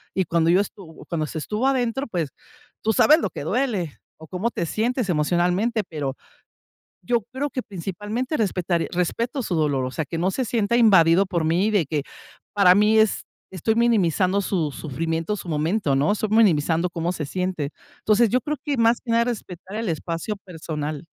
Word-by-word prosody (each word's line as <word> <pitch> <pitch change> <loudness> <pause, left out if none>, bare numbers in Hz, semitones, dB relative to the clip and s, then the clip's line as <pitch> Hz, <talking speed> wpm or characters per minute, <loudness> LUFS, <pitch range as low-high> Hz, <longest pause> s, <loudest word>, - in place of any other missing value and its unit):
y 190 - +1
cuando 165 0 +1
yo 185 - +5
estuvo 185 -5 -9
cuando 160 -2 -2
se 160 - -6
estuvo 210 +10 -2
adentro, 265 0 0
pues, 170 - -2 0.5
tú 220 - +1
sabes 305 +2 +6
lo - - -1
que - - -6
duele, 205 - -1 0.2
o 160 - -13
cómo 190 +7 -2
te 170 - -2
sientes 230 - -1
emocionalmente, 180 +8 +1
pero 145 -4 -4 0.9
yo 230 +4 +1
creo 280 +3 -2
que 255 - -3
principalmente 210 - -4
respetar 180 -5 0
respeto 230 - -1
su 180 - -2
dolor, 145 -4 +1
o 130 - -6
sea, 160 - -2
que 165 - -4
no 185 +3 +1
se 260 - -1
sienta 225 -1 0
invadido 190 -5 +5
por 170 -3 -1
mí, 175 +7 +2
de 200 -9 +2
que 150 -1 -1 0.5
para 185 -3 +6
mí 210 +2 +4
es 220 -2 +3 0.3
estoy 190 +5 0
minimizando 200 -5 +2
su 170 -6 -1
sufrimiento, 165 +7 -3
su 180 - -9
momento, 155 0 0
¿no?, 145 +9 +2
estoy 215 0 -1
minimizando 175 -6 +3
cómo 170 0 -2
se 155 -4 -4
siente, 180 -3 -2 0.3
entonces, 220 +2 +3
yo 255 - +2
creo 300 +4 -3
que 290 -2 -1
más 230 0 +3
que 235 - -7
nada 230 0 +4
respetar 195 -4 -6
el 225 -1 -2
espacio 165 +5 -3
personal. 155 -4 -5
185 Hz, 185 wpm, -23 LUFS, 165-225 Hz, 0.9 s, sabes